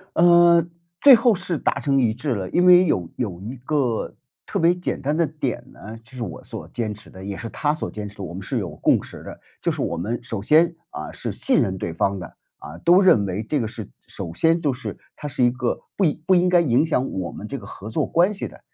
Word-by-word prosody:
呃， 170 Hz, -1 st, +6 dB, 0.4 s
最 280 Hz, -2 st, +10 dB
后 230 Hz, -1 st, +3 dB
是 180 Hz, -2 st, -3 dB
达 -, -, -1 dB
成 135 Hz, -2 st, +1 dB
一 115 Hz, -4 st, +2 dB
致 130 Hz, +2 st, -2 dB
了， 95 Hz, -3 st, -4 dB
因 180 Hz, -, +2 dB
为 180 Hz, 0 st, +8 dB
有 90 Hz, -, 0 dB
有 95 Hz, -7 st, -4 dB
一 115 Hz, +7 st, -6 dB
个 130 Hz, -2 st, -1 dB, 0.3 s
特 -, -, -3 dB
别 170 Hz, +1 st, +4 dB
简 180 Hz, 0 st, -3 dB
单 145 Hz, +2 st, 0 dB
的 165 Hz, +1 st, +2 dB
点 145 Hz, -5 st, -4 dB
呢， 110 Hz, +2 st, -10 dB
就 115 Hz, +3 st, -19 dB
是 125 Hz, -2 st, -5 dB
我 95 Hz, -, -7 dB
所 -, -, -8 dB
坚 110 Hz, -3 st, -3 dB
持 105 Hz, -, -14 dB
的 95 Hz, -, -12 dB
也 100 Hz, 0 st, -5 dB
是 115 Hz, -, -6 dB
他 150 Hz, +5 st, 0 dB
所 155 Hz, -, -4 dB
坚 105 Hz, -1 st, -6 dB
持 100 Hz, -, -13 dB
的， 100 Hz, -, -6 dB
我 90 Hz, -, -6 dB
们 95 Hz, -, -6 dB
是 95 Hz, -, -3 dB
有 -, -, -4 dB
共 -, -, +3 dB
识 -, -, -11 dB
的。 -, -, -10 dB, 0.2 s
就 -, -, +1 dB
是 -, -, -4 dB
我 -, -, -1 dB
们 110 Hz, +9 st, -3 dB
首 110 Hz, -4 st, -4 dB
先， 160 Hz, -, +4 dB, 0.2 s
啊， 75 Hz, -, -6 dB
是 -, -, -5 dB
信 -, -, +2 dB
任 95 Hz, -1 st, -1 dB
对 85 Hz, -2 st, -4 dB
方 100 Hz, +4 st, 0 dB
的， 90 Hz, -3 st, -9 dB, 0.2 s
啊， 75 Hz, -, -10 dB
都 180 Hz, +3 st, +5 dB
认 115 Hz, -, +5 dB
为 95 Hz, +3 st, -3 dB
这 145 Hz, +6 st, -1 dB
个 115 Hz, -, -1 dB
是 110 Hz, -2 st, -8 dB, 0.2 s
首 85 Hz, -, -7 dB
先 165 Hz, -, +2 dB
就 150 Hz, -5 st, 0 dB
是 125 Hz, +1 st, -7 dB, 0.2 s
它 150 Hz, -, -7 dB
是 130 Hz, -3 st, -1 dB
一 120 Hz, -, +4 dB
个 125 Hz, -1 st, -2 dB, 0.2 s
不 200 Hz, -, 0 dB
应 155 Hz, -2 st, 0 dB
不 190 Hz, -, +4 dB
应 180 Hz, 0 st, +3 dB
该 180 Hz, -, +5 dB
影 150 Hz, -3 st, +3 dB
响 135 Hz, -5 st, 0 dB
我 90 Hz, -3 st, -4 dB
们 105 Hz, -, -8 dB
这 140 Hz, -, -5 dB
个 -, -, -12 dB
合 105 Hz, -, -10 dB
作 110 Hz, -, -1 dB
关 180 Hz, +5 st, +3 dB
系 200 Hz, -, -4 dB
的， -, -, -15 dB
130 Hz, 280 characters per minute, -22 LUFS, 105-165 Hz, 0.4 s, 最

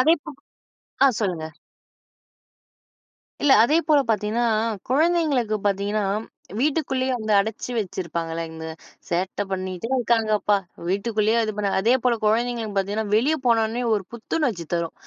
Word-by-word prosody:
அதேபோ 320 Hz, +3 st, +2 dB, 0.7 s
ஆ -, -, +8 dB
சொல்லுங்க. 175 Hz, -6 st, -1 dB, 2.0 s
இல்ல, 280 Hz, -2 st, +5 dB
அதேபோல 305 Hz, +2 st, +3 dB
பாத்தீன்னா, 215 Hz, +3 st, 0 dB, 0.5 s
குழந்தைங்களுக்கு 290 Hz, -7 st, +2 dB
பாத்தீங்கன்னா 200 Hz, +1 st, 0 dB, 0.6 s
வீட்டுக்குள்ளயே 265 Hz, -3 st, 0 dB
அந்த 215 Hz, -1 st, -3 dB
அடச்சி 220 Hz, +4 st, -3 dB
வச்சிருப்பாங்கலங்க, 165 Hz, -4 st, -4 dB, 0.5 s
"சேட்ட 185 Hz, +3 st, -1 dB
பண்ணிட்டே 185 Hz, +2 st, -3 dB
இருக்காங்கப்பா! 215 Hz, -3 st, +2 dB, 0.3 s
வீட்டுக்குள்ளயே 215 Hz, +3 st, +1 dB
இது 215 Hz, -, -1 dB
பண்ண." 205 Hz, -1 st, 0 dB
அதே 230 Hz, +6 st, +3 dB
போல 250 Hz, -, +3 dB
குழந்தைங்களுக்கு 225 Hz, -1 st, 0 dB
பாத்தீங்கன்னா 205 Hz, +3 st, -1 dB
வெளிய 280 Hz, +8 st, +3 dB
போனோன்னே 230 Hz, 0 st, +2 dB
ஒரு 205 Hz, -2 st, 0 dB
புத்துணர்ச்சி 235 Hz, -, -2 dB
தரும், 170 Hz, -1 st, -1 dB
220 Hz, 110 wpm, -23 LUFS, 195-250 Hz, 2.0 s, ஆ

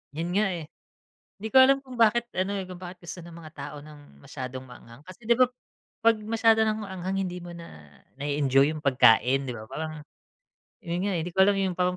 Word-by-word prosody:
'Yon 165 Hz, +2 st, -3 dB
nga, 215 Hz, +1 st, +3 dB
eh. 165 Hz, -3 st, -6 dB, 0.7 s
'Di 220 Hz, -, -4 dB
ko -, -, +5 dB
alam 270 Hz, +1 st, +6 dB
kung 255 Hz, -1 st, -10 dB
bakit 235 Hz, +1 st, +4 dB
ano, 190 Hz, +2 st, -1 dB
eh, 190 Hz, -, -5 dB
kung 180 Hz, -1 st, -9 dB
bakit 180 Hz, 0 st, -10 dB
gusto 175 Hz, +1 st, -7 dB
ng 170 Hz, -1 st, -12 dB
mga 160 Hz, -2 st, -11 dB
tao 145 Hz, +1 st, -7 dB
ng 145 Hz, -, -15 dB
masyadong 130 Hz, 0 st, -7 dB
maanghang, 125 Hz, 0 st, -14 dB
kasi 185 Hz, +5 st, -13 dB
'di 235 Hz, -, +5 dB
ba 255 Hz, -, +6 dB, 0.5 s
pag 230 Hz, 0 st, +4 dB
masyado 225 Hz, 0 st, +3 dB
ng 215 Hz, 0 st, 0 dB
maanghang 190 Hz, -1 st, -4 dB
hindi 180 Hz, 0 st, -6 dB
mo 175 Hz, -, -8 dB
na 170 Hz, -1 st, -10 dB, 0.5 s
na-e-enjoy 140 Hz, 0 st, +2 dB
'yong 155 Hz, -, -5 dB
pagkain 130 Hz, 0 st, +4 dB
'di -, -, -2 dB
ba 110 Hz, -1 st, -9 dB
parang 155 Hz, +4 st, -6 dB, 0.8 s
'yon 175 Hz, -2 st, -3 dB
nga, 200 Hz, -, 0 dB
hindi 175 Hz, -, -4 dB
ko 190 Hz, -, -11 dB
alam 200 Hz, 0 st, +3 dB
yung 190 Hz, -2 st, -1 dB
parang 180 Hz, 0 st, +1 dB
175 Hz, 210 wpm, -26 LUFS, 145-205 Hz, 0.8 s, alam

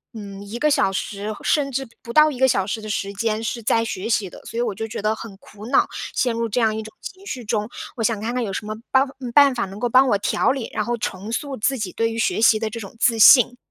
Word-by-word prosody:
嗯， 200 Hz, -2 st, -8 dB
1 205 Hz, +3 st, -7 dB
个 300 Hz, +5 st, +2 dB
小 195 Hz, -, +2 dB
时， 205 Hz, +2 st, -4 dB
甚 285 Hz, -2 st, +1 dB
至 270 Hz, 0 st, -3 dB
不 235 Hz, -, -8 dB
到 305 Hz, +2 st, +6 dB
1 255 Hz, -, -8 dB
个 265 Hz, -, +5 dB
小 195 Hz, -6 st, +1 dB
时 215 Hz, +2 st, -4 dB
的 215 Hz, -, -7 dB
时 200 Hz, -1 st, -3 dB
间 215 Hz, +2 st, -2 dB
是 235 Hz, +1 st, -3 dB
在 230 Hz, +1 st, +1 dB
学 220 Hz, 0 st, -4 dB
习 215 Hz, -3 st, +1 dB
的。 -, -, -12 dB
所 -, -, -7 dB
以 -, -, +1 dB
我 230 Hz, -4 st, -1 dB
就 225 Hz, +3 st, -5 dB
觉 220 Hz, -2 st, -6 dB
得 215 Hz, +1 st, +1 dB
很 215 Hz, -4 st, -10 dB
苦 210 Hz, +2 st, -13 dB
恼， 270 Hz, -, +3 dB, 0.3 s
陷 245 Hz, -2 st, +1 dB
入 230 Hz, 0 st, -2 dB
这 245 Hz, -, 0 dB
样 220 Hz, -1 st, +2 dB
一 220 Hz, -, -3 dB
种 220 Hz, -, -10 dB
情 380 Hz, +1 st, -10 dB
绪 255 Hz, -10 st, -5 dB
中， 210 Hz, 0 st, -1 dB, 0.3 s
我 225 Hz, -, -3 dB
想 225 Hz, -2 st, +1 dB
看 230 Hz, +2 st, -3 dB
看 250 Hz, -1 st, -1 dB
有 200 Hz, -, -3 dB
什 210 Hz, -, -4 dB
么 215 Hz, -, -4 dB, 0.2 s
办 265 Hz, 0 st, +5 dB, 0.2 s
呃， 250 Hz, -3 st, -6 dB
办 280 Hz, -1 st, +6 dB
法 235 Hz, -4 st, -1 dB
能 195 Hz, +2 st, -10 dB
够 245 Hz, -, -1 dB
帮 260 Hz, +3 st, +5 dB
我 205 Hz, -, +3 dB
调 205 Hz, -, +1 dB
理， 265 Hz, -4 st, -4 dB
然 215 Hz, -, -1 dB
后 240 Hz, 0 st, -1 dB
重 205 Hz, 0 st, -5 dB
塑 275 Hz, +2 st, -3 dB
自 265 Hz, +5 st, 0 dB
己 205 Hz, -6 st, -4 dB
对 230 Hz, 0 st, 0 dB
于 225 Hz, -, -5 dB
学 220 Hz, -, 0 dB
习 220 Hz, -1 st, +5 dB
的 220 Hz, -, -2 dB
这 230 Hz, +2 st, -7 dB
种 200 Hz, +1 st, -10 dB
自 230 Hz, -2 st, +3 dB
信。 245 Hz, +2 st, +7 dB
225 Hz, 300 characters per minute, -22 LUFS, 210-245 Hz, 0.3 s, 信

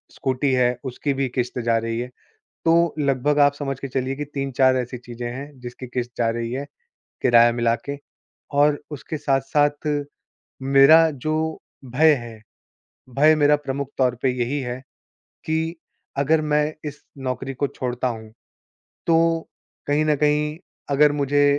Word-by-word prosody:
Scooty 130 Hz, +1 st, 0 dB
है, 125 Hz, -1 st, +2 dB
उसकी 140 Hz, +2 st, -2 dB
भी 135 Hz, 0 st, -1 dB
किश्त 125 Hz, 0 st, -2 dB
जा 115 Hz, -1 st, +2 dB
रही 115 Hz, +1 st, -2 dB
है। 125 Hz, -, -3 dB, 0.6 s
तो 165 Hz, 0 st, +3 dB
लगभग 145 Hz, 0 st, +1 dB
आप 145 Hz, -1 st, +6 dB
समझ 135 Hz, -2 st, -4 dB
के 140 Hz, -, -5 dB
चलिए 130 Hz, +1 st, -2 dB
कि 150 Hz, -, -3 dB
3-4 135 Hz, -2 st, +1 dB
ऐसी 125 Hz, 0 st, -3 dB
चीज़ें 120 Hz, 0 st, -7 dB
हैं 140 Hz, +2 st, -8 dB
जिसकी 125 Hz, +1 st, -8 dB
किश्त 125 Hz, 0 st, -4 dB
जा 115 Hz, -, +2 dB
रही 115 Hz, 0 st, -3 dB
है, 135 Hz, +3 st, -3 dB, 0.6 s
किराया 120 Hz, 0 st, +6 dB
मिला 115 Hz, -1 st, +1 dB
के 140 Hz, 0 st, -4 dB, 0.6 s
और 145 Hz, 0 st, +3 dB
उसके 150 Hz, +2 st, -5 dB
साथ-साथ 145 Hz, +2 st, +1 dB, 0.7 s
मेरा 140 Hz, +4 st, +6 dB
जो 155 Hz, +2 st, -3 dB, 0.5 s
भय 150 Hz, +5 st, +4 dB
है, 115 Hz, -4 st, -8 dB, 0.7 s
भय 150 Hz, +5 st, +5 dB
मेरा 150 Hz, 0 st, +4 dB
प्रमुख 140 Hz, -1 st, -4 dB
तौर 130 Hz, -2 st, +3 dB
पे 130 Hz, -, +3 dB
यही 130 Hz, +4 st, 0 dB
है 125 Hz, -1 st, -4 dB, 0.6 s
कि 160 Hz, +1 st, -1 dB, 0.4 s
अगर 155 Hz, +3 st, +3 dB
मैं 150 Hz, 0 st, +1 dB
इस 145 Hz, 0 st, -11 dB, 0.2 s
नौकरी 135 Hz, +1 st, -4 dB
को 140 Hz, +2 st, 0 dB
छोड़ता 125 Hz, 0 st, -3 dB
हूँ, 110 Hz, -2 st, -7 dB, 0.7 s
तो 165 Hz, 0 st, +2 dB, 0.4 s
कहीं 145 Hz, +2 st, +2 dB
न 150 Hz, -, +3 dB
कहीं 150 Hz, +1 st, +1 dB, 0.3 s
अगर 145 Hz, +1 st, +5 dB
मुझे 145 Hz, 0 st, +2 dB
135 Hz, 155 wpm, -23 LUFS, 125-150 Hz, 0.7 s, आप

